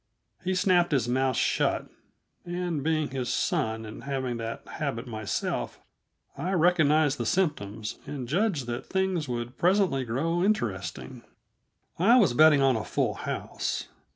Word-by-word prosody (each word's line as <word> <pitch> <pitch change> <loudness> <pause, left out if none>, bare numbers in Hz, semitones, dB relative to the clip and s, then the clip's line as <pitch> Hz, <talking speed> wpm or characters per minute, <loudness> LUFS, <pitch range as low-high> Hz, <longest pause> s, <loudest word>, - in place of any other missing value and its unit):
He 185 +1 0
snapped 180 -3 +3
his 125 -4 +2
mouth 130 +1 +1
shut, - - +1 0.6
and, 175 -3 -3
being 155 -1 +1
his 130 -2 -3
son 110 0 0
and 110 +4 -9
having 130 -3 -2
that 115 0 -6
habit 140 -5 -4
myself, 110 -4 -3 0.6
I 185 +2 -2
recognized 155 -5 +3
the 120 - -1
symptoms 110 - -1
and 135 -4 -5
judged 170 - 0
that 120 +1 -5
things 190 -6 -1
would 120 +1 -4
presently 180 -7 +3
grow 155 +9 -1
interesting. 120 - -2 0.8
I 225 +8 +6
was 200 - +4
betting 150 0 +6
on 135 -2 +4
a 110 - -2
full - - 0
house. - - -4
140 Hz, 140 wpm, -27 LUFS, 120-175 Hz, 0.8 s, I